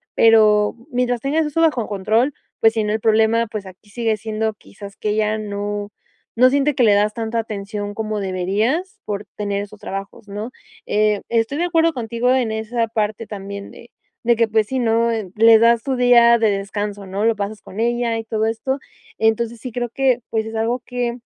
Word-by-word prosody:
pero 215 -2 +5 0.2
mientras 245 -1 0
tengas 305 +5 +1
eso 300 +2 -2
bajo 285 -9 +2
control, 215 +7 +1 0.3
pues 225 - +6
si, 220 -1 0
¿no?, 210 - -1
el 220 - 0
problema, 225 +1 +3
pues 210 -2 -6
aquí 190 +2 -14
sigue 225 0 0
siendo 220 +1 -2
quizás 200 -1 -12
que 215 - -2
ella 215 0 +1
no 205 -1 -4 0.5
no 250 +2 +6
siente 285 +2 +2
que 255 - +2
le 215 -3 +5
das 210 +1 +2
tanta 230 0 -3
atención 205 -1 -5
como 215 0 -3
deberías 205 - -1
por 205 0 -4
tener 200 -1 -2
esos 205 +1 -12
trabajos, 195 +2 -7
¿no?, 210 +4 -6 0.3
eh, 210 -1 +1
estoy 230 +4 0
de 350 - +1
acuerdo 330 -1 +2
contigo 235 0 -1
en 250 -4 +1
esa 225 +2 -1
parte 215 0 -2
también 200 -1 -7
de 235 - -15 0.3
de 235 -1 +3
que 230 0 +3
pues 215 -1 +1
si, 260 +3 -2
¿no?, 230 -1 +2 0.3
le 225 +1 +7
das 230 0 +4
tu 265 -2 -1
día 240 -1 +6
de 220 -1 +3
descanso, 200 0 -3
¿no?, 195 +3 -2
lo 230 0 +3
pasas 205 +1 -4
con 205 +4 -7
ella 235 0 0
y 225 - -4
todo 220 -1 -1
esto, 225 +4 -1 0.4
entonces 225 +1 0
sí, 255 -1 -7
creo 240 0 -2
que 255 0 +1
pues 220 -1 -1
es 220 0 -7
algo 230 +3 0
que 245 -1 -2
220 Hz, 195 wpm, -20 LUFS, 210-235 Hz, 0.5 s, le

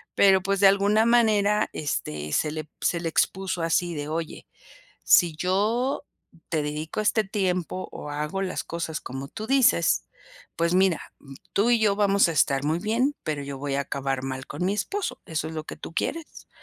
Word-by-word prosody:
pero 190 -1 +5
pues, 195 +1 0
de 200 - +7
alguna 200 +3 +4
manera, 215 -3 +3
este, 75 - -3
se 150 - +1
le 155 0 -5
se 170 - +1
le 165 -1 -2
expuso 190 +1 0
así 170 +1 +1
de: 145 -1 -4
"Oye, 160 0 -5 0.6
si 170 -4 +5
yo 215 - 0 0.5
te 160 -3 0
dedico 150 +5 -4
este 215 +1 +2
tiempo 185 -2 -2
o 150 - -8
hago 150 +6 -3
las 185 -2 -2
cosas 165 -2 -4
como 135 +2 -6
tú 215 +8 -7
dices, 200 - +3 0.5
pues 170 +1 +1
mira, 185 -2 +3 0.5
tú 210 +4 +3
y 240 -1 +4
yo 210 -2 +3
vamos 200 -2 +4
a 165 - -2
estar 140 -2 +2
muy 160 +3 +1
bien, 240 +8 0
pero 150 -2 -2
yo 140 0 -6
voy 140 0 -3
a 140 - +1
acabar 135 -1 -3
mal 130 0 -4
con 180 - -4
mi 195 - +1
esposo, 375 - -3
¿eso 160 -1 -3
es 160 - -7
lo 155 -1 -4
que - - -9
tú - - -9
quieres?" 325 - -4
180 Hz, 190 wpm, -25 LUFS, 155-205 Hz, 0.6 s, de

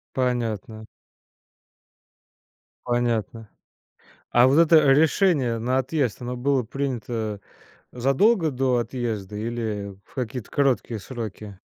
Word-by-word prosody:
Понятно. 115 -4 -2 2.0
Понятно. 115 -2 -1 0.8
А 120 +1 +5
вот 135 +4 +4
это 160 -3 +6
решение 145 - +3
на 125 +3 0
отъезд, 130 -4 -1
оно 125 +1 -4
было 130 +1 +1
принято 115 -4 -4 0.5
задолго 155 - +2
до 130 -1 +1
отъезда 110 -5 -4
или 110 -3 -4
в - - -24
какие-то 125 -2 -5
короткие 125 -5 0
сроки? 105 -4 -7
120 Hz, 95 wpm, -24 LUFS, 110-135 Hz, 2.0 s, это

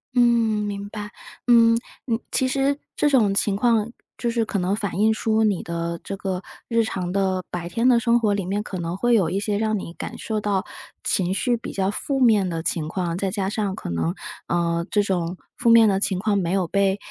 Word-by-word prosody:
嗯， 245 - +5 0.4
明 200 0 -5
白。 210 -1 -7 0.4
嗯， 230 -1 +6 0.3
你 230 -2 0
其 260 - +1
实 275 +2 +1 0.2
这 295 - +2
种 220 -8 +3
情 200 0 +1
况 230 0 +2 0.3
就 240 - -1
是 230 -1 +1
可 215 -2 -2
能 185 +2 0
反 200 -3 -3
映 220 +1 +4
出 220 0 +1
你 205 -4 +1
的 170 0 -4
这 195 - -5
个 190 -2 -3 0.3
日 230 -1 +2
常 180 -4 -3
的 190 -1 0
白 175 -1 -4
天 230 +8 +1
的 240 -2 +5
生 235 0 +3
活 210 -3 +2
里 200 -2 -1
面， 205 +3 -1
可 185 -4 -6
能 170 +1 -3
会 240 +4 +2
有 190 -8 +3
一 195 - -1
些 205 0 -1
让 220 -1 +1
你 170 -3 -7
感 - - -7
受 215 -2 -3
到 205 -1 0 0.4
情 185 -1 0
绪 240 +4 +1
比 225 - -7
较 195 0 0
负 270 +5 -2
面 215 -6 +4
的 165 -1 -3
情 155 -3 -1
况， 175 -1 -2
再 195 - 0
加 195 -1 -2
上 205 -3 -2
可 - - -7
能， 80 0 -1 0.3
呃， 170 -1 0
这 205 0 +2
种 180 -2 -2 0.2
负 235 - +2
面 230 -1 +7
的 195 -1 +2
情 190 -2 0
况 205 +1 0
没 175 -1 -1
有 190 -3 +1
被 195 +1 +2
200 Hz, 240 characters per minute, -23 LUFS, 185-225 Hz, 0.4 s, 面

